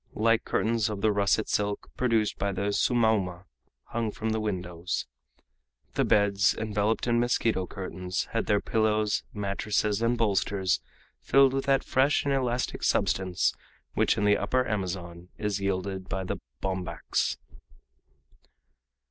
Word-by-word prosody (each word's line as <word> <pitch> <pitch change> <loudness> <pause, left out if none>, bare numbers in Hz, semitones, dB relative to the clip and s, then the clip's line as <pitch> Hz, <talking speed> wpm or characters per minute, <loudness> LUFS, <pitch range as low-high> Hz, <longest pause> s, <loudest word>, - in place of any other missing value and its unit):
Light 115 +1 +3
curtains 115 0 +1
of 105 -2 -4
the 110 - +3
russet 100 +1 +2
silk, 105 0 -1
produced 115 -4 +1
by 100 0 0
the 100 +2 -1
"sumauma," 105 -7 +1 0.5
hung 115 -1 -1
from 110 +1 -3
the 110 - 0
windows. 90 -4 -3 0.9
The - - +1
beds, 100 0 +3
enveloped 110 0 0
in 120 -1 +2
mosquito 115 -5 +1
curtains, 95 -1 -4
had 115 - -1
their 105 -1 +3
pillows, 110 -2 +1
mattresses, 105 +1 -1
and 115 +1 +2
bolsters 100 -3 +1 0.4
filled 135 -1 +5
with 135 0 -1
that 135 -1 +3
fresh 140 +3 +2
and 140 - +2
elastic 125 -2 -1
substance 95 -1 +1 0.4
which - - +2
in - - 0
the 105 0 +5
Upper 125 0 +1
Amazon 90 -4 -4
is 105 -2 -2
yielded 95 -1 -2
by 95 +1 -2
the 90 - -3 0.3
bombax. 95 -1 -1
105 Hz, 135 wpm, -28 LUFS, 95-115 Hz, 0.9 s, filled